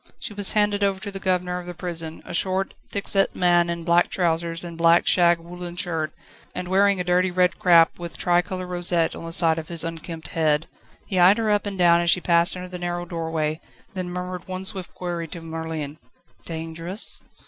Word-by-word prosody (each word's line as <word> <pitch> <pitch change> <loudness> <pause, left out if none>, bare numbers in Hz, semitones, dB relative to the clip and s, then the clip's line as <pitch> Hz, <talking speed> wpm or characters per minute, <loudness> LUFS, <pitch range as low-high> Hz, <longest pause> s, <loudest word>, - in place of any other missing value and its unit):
She 215 - -7
was 205 -1 +1
handed 205 -1 +2
over 195 -1 +1
to 200 +1 -6
the 195 - -4
governor 180 -1 0
of 175 - -10
the 175 - -6
prison, 165 -2 -5
a - - -8
short, 190 +2 -1
thick 200 - -4
set 195 -1 +2
man 175 -1 +3
in 170 -1 -3
black 170 +1 +3
trousers 170 -2 -1
and 170 -1 -7
black 165 +1 +4
shag 175 -1 +5
woollen 175 +1 -8
shirt, 165 -4 -1 0.4
and 180 0 -4
wearing 195 +1 +3
a - - 0
dirty 180 +1 +2
red 180 0 +1
cap, 170 -2 +5
with 170 -5 -7
tricolour 180 +1 0
rosette 175 -2 0
on - - -8
the 165 - -6
side 165 -1 +4
of 160 - -8
his 170 -2 0
unkempt 165 0 -6
head. 155 -1 +1 0.4
He 185 - -1
eyed 185 +4 +7
her 220 -2 +1
up 205 0 +1
and 200 -1 -4
down 170 -1 +5
as 170 - +1
she 180 - +5
passed 170 0 +3
under 180 0 -6
the 180 0 -7
narrow 175 0 -3
doorway, 160 -2 -2 0.3
then 185 -2 -4
murmured 180 0 -5
one 185 0 -5
swift 190 -1 -1
query 175 -2 -4
to 170 - -8
Merlin: 160 -2 -5 0.5
"Dangerous?" 165 +5 -5
175 Hz, 205 wpm, -24 LUFS, 165-185 Hz, 0.5 s, eyed